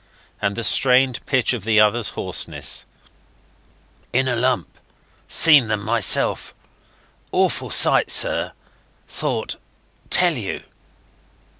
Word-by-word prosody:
and 100 Hz, 0 st, -2 dB
the 115 Hz, -, -5 dB
strained 130 Hz, +1 st, +1 dB
pitch 130 Hz, -3 st, 0 dB
of 115 Hz, -6 st, -6 dB
the 110 Hz, 0 st, +1 dB
other's 110 Hz, +1 st, +1 dB
hoarseness. -, -, -2 dB, 1.2 s
"In 130 Hz, +2 st, 0 dB
a 125 Hz, -, -1 dB
lump... 120 Hz, -, -2 dB, 0.5 s
seen 150 Hz, -7 st, +5 dB
them 105 Hz, -1 st, -3 dB
myself.... 115 Hz, -3 st, 0 dB, 0.8 s
Awful -, -, -1 dB
sight, -, -, +4 dB
sir... -, -, +1 dB, 0.5 s
thought... -, -, -4 dB, 0.5 s
tell 180 Hz, -1 st, +3 dB
you." 110 Hz, -9 st, -6 dB
120 Hz, 105 wpm, -20 LUFS, 110-130 Hz, 1.2 s, seen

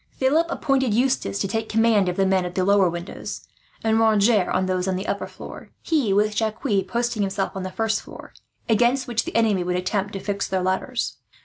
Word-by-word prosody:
Philip 300 Hz, +6 st, +2 dB
appointed 265 Hz, -8 st, +1 dB
Eustace 245 Hz, -, +1 dB
to -, -, -1 dB
take 220 Hz, +2 st, -3 dB
the -, -, -6 dB
command 220 Hz, -4 st, +3 dB
of 180 Hz, -, -4 dB
the 195 Hz, -, +3 dB
men 190 Hz, -1 st, +2 dB
at 180 Hz, 0 st, -6 dB
the 185 Hz, -, +1 dB
lower 200 Hz, -2 st, +4 dB
windows; 175 Hz, +2 st, -6 dB, 0.4 s
and 225 Hz, 0 st, +2 dB
Roger 215 Hz, -2 st, +3 dB
of 185 Hz, 0 st, +1 dB
those 185 Hz, 0 st, -1 dB
on 190 Hz, -, 0 dB
the 190 Hz, +2 st, -4 dB
upper -, -, -2 dB
floor; -, -, -11 dB
he, 290 Hz, -11 st, +1 dB
with 210 Hz, +2 st, +2 dB
Jacques, 220 Hz, +1 st, -2 dB, 0.2 s
posting 235 Hz, +2 st, -1 dB
himself 195 Hz, 0 st, -1 dB
on 190 Hz, -, -5 dB
the 185 Hz, -, -4 dB
first 220 Hz, +2 st, -1 dB
floor, -, -, -12 dB, 0.3 s
against 240 Hz, +4 st, +2 dB
which 230 Hz, -2 st, -1 dB
the -, -, -6 dB
enemy 215 Hz, -5 st, +2 dB
would 180 Hz, 0 st, -1 dB
attempt 195 Hz, +2 st, -2 dB
to 195 Hz, -, -4 dB
fix 200 Hz, +1 st, -3 dB
their 185 Hz, -1 st, -1 dB
ladders. 190 Hz, +7 st, -2 dB
205 Hz, 215 wpm, -23 LUFS, 190-230 Hz, 0.4 s, lower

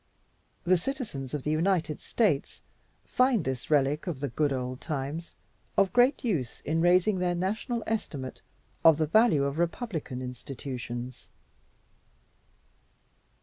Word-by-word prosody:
The 185 Hz, 0 st, +4 dB
citizens 180 Hz, -, -4 dB
of 145 Hz, -, -4 dB
the 150 Hz, -, 0 dB
United 160 Hz, -1 st, +1 dB
States 190 Hz, -, 0 dB, 0.4 s
find 250 Hz, -, +2 dB
this 130 Hz, -2 st, -3 dB
relic 145 Hz, +2 st, +2 dB
of 160 Hz, -7 st, -3 dB
the 140 Hz, 0 st, -2 dB
good 145 Hz, +5 st, +1 dB
old 130 Hz, -1 st, -3 dB
times 150 Hz, +2 st, -4 dB, 0.4 s
of 195 Hz, -1 st, +3 dB
great 250 Hz, +3 st, +4 dB
use 160 Hz, -, -2 dB
in 160 Hz, +1 st, 0 dB
raising 180 Hz, +3 st, +4 dB
their 180 Hz, -1 st, +1 dB
national 220 Hz, +6 st, -2 dB
estimate 145 Hz, -12 st, -4 dB, 0.4 s
of 160 Hz, -2 st, +7 dB
the 155 Hz, -, +2 dB
value 165 Hz, -3 st, +4 dB
of 140 Hz, +3 st, -2 dB
republican 170 Hz, -, -2 dB
institutions. 125 Hz, -1 st, -6 dB
155 Hz, 125 wpm, -28 LUFS, 135-195 Hz, 0.4 s, of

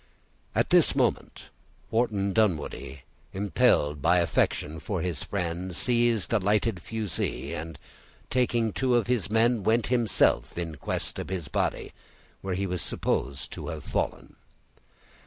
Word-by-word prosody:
At -, -, +1 dB
this -, -, +5 dB
moment -, -, -1 dB, 0.4 s
Wharton 105 Hz, -4 st, +1 dB
Dunwoodie, 75 Hz, -, -1 dB, 0.3 s
impelled 75 Hz, -6 st, +2 dB
by 90 Hz, +5 st, +4 dB
affection 80 Hz, -2 st, 0 dB
for 95 Hz, +4 st, -3 dB
his 90 Hz, -2 st, -2 dB
friend, 90 Hz, -1 st, -3 dB
seized 120 Hz, 0 st, +2 dB
a 115 Hz, -, +4 dB
lighted 105 Hz, 0 st, +1 dB
fusee, 110 Hz, -3 st, -3 dB
and 80 Hz, -1 st, -6 dB, 0.5 s
taking 120 Hz, -3 st, +1 dB
two 130 Hz, -2 st, +1 dB
of 120 Hz, -, +3 dB
his 120 Hz, -5 st, 0 dB
men 115 Hz, +1 st, +3 dB
went 110 Hz, +3 st, +2 dB
himself 115 Hz, -8 st, +2 dB
in 85 Hz, -2 st, -3 dB
quest 75 Hz, -, -3 dB
of -, -, -5 dB
his 90 Hz, -6 st, -4 dB
body, -, -, -1 dB, 0.5 s
where 95 Hz, -1 st, -2 dB
he 100 Hz, +2 st, -1 dB
was 90 Hz, -3 st, -2 dB
supposed 70 Hz, 0 st, -2 dB
to -, -, -7 dB
have -, -, -5 dB
fallen. -, -, -3 dB
95 Hz, 140 wpm, -27 LUFS, 85-115 Hz, 0.5 s, this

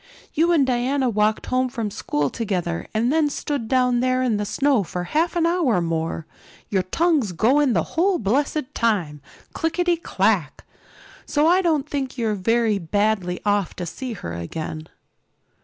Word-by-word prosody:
"You 335 Hz, +3 st, +3 dB
and 310 Hz, -5 st, +4 dB
Diana 260 Hz, +1 st, +1 dB
walked 215 Hz, 0 st, +1 dB
home 255 Hz, 0 st, 0 dB
from 230 Hz, -5 st, -3 dB
school 145 Hz, -9 st, -1 dB
together 180 Hz, -6 st, -2 dB
and 235 Hz, +5 st, +1 dB
then 315 Hz, -2 st, +3 dB
stood 280 Hz, -4 st, -3 dB
down 250 Hz, 0 st, +2 dB
there 255 Hz, +1 st, +1 dB
in 235 Hz, -5 st, +1 dB
the 205 Hz, -, -2 dB
snow 270 Hz, 0 st, +2 dB
for 180 Hz, 0 st, -4 dB
half 320 Hz, -, 0 dB
an 335 Hz, -1 st, +2 dB
hour 335 Hz, -, +2 dB
more, 165 Hz, -1 st, -2 dB, 0.4 s
your 195 Hz, -2 st, +1 dB
tongues 280 Hz, -, +1 dB
going 255 Hz, -, +3 dB
the -, -, +2 dB
whole 365 Hz, +3 st, +2 dB
blessed 275 Hz, +6 st, -1 dB
time, 175 Hz, -11 st, 0 dB, 0.3 s
clickety 345 Hz, +1 st, 0 dB
clack. 335 Hz, -, 0 dB, 0.6 s
So 295 Hz, +1 st, +2 dB
I 355 Hz, +3 st, +5 dB
don't 310 Hz, -6 st, +1 dB
think 275 Hz, -3 st, -3 dB
you're 225 Hz, -3 st, 0 dB
very 220 Hz, +1 st, +1 dB
badly 190 Hz, 0 st, 0 dB
off 205 Hz, -3 st, +1 dB
to 180 Hz, -, -4 dB
see 250 Hz, +8 st, -5 dB
her 85 Hz, -, -6 dB
again." 155 Hz, -, -5 dB
235 Hz, 160 wpm, -22 LUFS, 195-290 Hz, 0.6 s, I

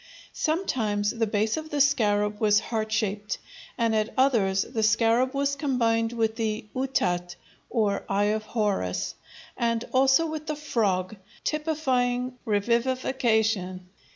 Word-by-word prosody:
Sometimes 220 Hz, -, 0 dB
the 230 Hz, -1 st, -1 dB
base 215 Hz, +3 st, 0 dB
of 315 Hz, 0 st, -5 dB
the 295 Hz, -, -2 dB
scarab 210 Hz, -7 st, +2 dB
was 210 Hz, -1 st, +5 dB
heart 220 Hz, -1 st, -3 dB
shaped 210 Hz, -1 st, -1 dB, 0.4 s
and 230 Hz, -3 st, +1 dB
at 215 Hz, 0 st, 0 dB
others 215 Hz, -8 st, +3 dB
the 230 Hz, -3 st, -3 dB
scarab 230 Hz, +4 st, +3 dB
was 280 Hz, 0 st, +1 dB
combined 230 Hz, -5 st, +1 dB
with 225 Hz, -1 st, -1 dB
the 220 Hz, -1 st, -2 dB
"utat," 180 Hz, -10 st, -1 dB, 0.3 s
or 205 Hz, -4 st, 0 dB
eye 205 Hz, +2 st, +2 dB
of 215 Hz, -, -1 dB
Horus, 210 Hz, -, -1 dB, 0.4 s
and 230 Hz, 0 st, 0 dB
also 265 Hz, +4 st, +4 dB
with 310 Hz, -1 st, -5 dB
the 305 Hz, -, -1 dB
frog, 215 Hz, -9 st, -1 dB, 0.3 s
typifying 260 Hz, -5 st, 0 dB
revivification. 220 Hz, -4 st, 0 dB
225 Hz, 125 wpm, -26 LUFS, 210-260 Hz, 0.4 s, was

